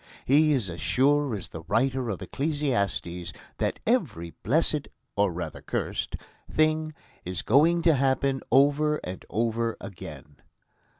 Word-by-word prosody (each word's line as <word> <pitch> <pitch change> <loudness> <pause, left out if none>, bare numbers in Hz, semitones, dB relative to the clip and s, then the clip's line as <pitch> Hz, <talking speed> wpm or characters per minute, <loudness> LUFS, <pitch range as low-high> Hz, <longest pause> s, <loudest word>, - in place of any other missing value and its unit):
He 150 +3 +5
is 130 -9 +1
as 85 -3 -6
sure 140 - +2
as 95 - -6
the 80 - -7
writer 125 +4 +1
of 100 - -3
Ecclesiastes 115 - -1 0.3
that - - -1
every 120 - 0
blessed 150 - +1 0.3
or, 100 -2 +2
rather, 85 -2 -5
cursed - - -3 0.3
thing 155 0 +1 0.3
is 90 0 -4
going 165 +7 +4
to 165 -1 +6
happen 135 0 +1
over 145 +2 +4
and 90 +1 -6
over 115 0 0
again. 75 -6 -9
130 Hz, 130 wpm, -27 LUFS, 100-150 Hz, 0.3 s, to